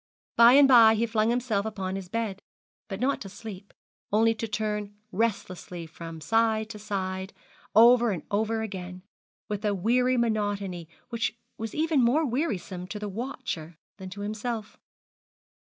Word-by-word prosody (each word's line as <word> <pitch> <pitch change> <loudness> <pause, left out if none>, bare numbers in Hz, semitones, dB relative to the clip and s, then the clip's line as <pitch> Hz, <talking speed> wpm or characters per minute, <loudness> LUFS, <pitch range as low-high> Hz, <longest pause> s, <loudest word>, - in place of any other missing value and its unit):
By 235 +1 +8
and 280 0 +8
by 230 -4 +8
he 225 +2 +1
flung 220 -1 +1
himself 235 -4 0
upon 195 -3 -4
his 190 -2 -6
bed, 215 -2 -3 0.5
but 195 -2 -5
not 270 +4 0
to 195 - -7
sleep, 200 -1 -10 0.4
only 225 +2 +4
to 225 0 -4
turn 210 -1 -3 0.2
restlessly 185 -5 -2
from 165 0 -9
side 220 +5 +1
to 210 - -8
side, 190 -2 -4 0.4
over 240 +1 +7
and 180 -7 -3
over 220 +2 0
again, 185 -3 -7 0.4
with 210 0 -4
a 205 -1 +1
weary 250 +6 +2
monotony 205 -7 -1 0.2
which 230 -1 -2 0.2
was 225 -1 -5
even 315 -2 +2
more 265 +7 +3
wearisome 210 - -2
to 195 - -6
the 210 0 -4
watcher 200 - -5 0.2
than 190 -2 -8
to 200 +2 -8
himself. 215 +1 -4
215 Hz, 155 wpm, -27 LUFS, 195-230 Hz, 0.5 s, By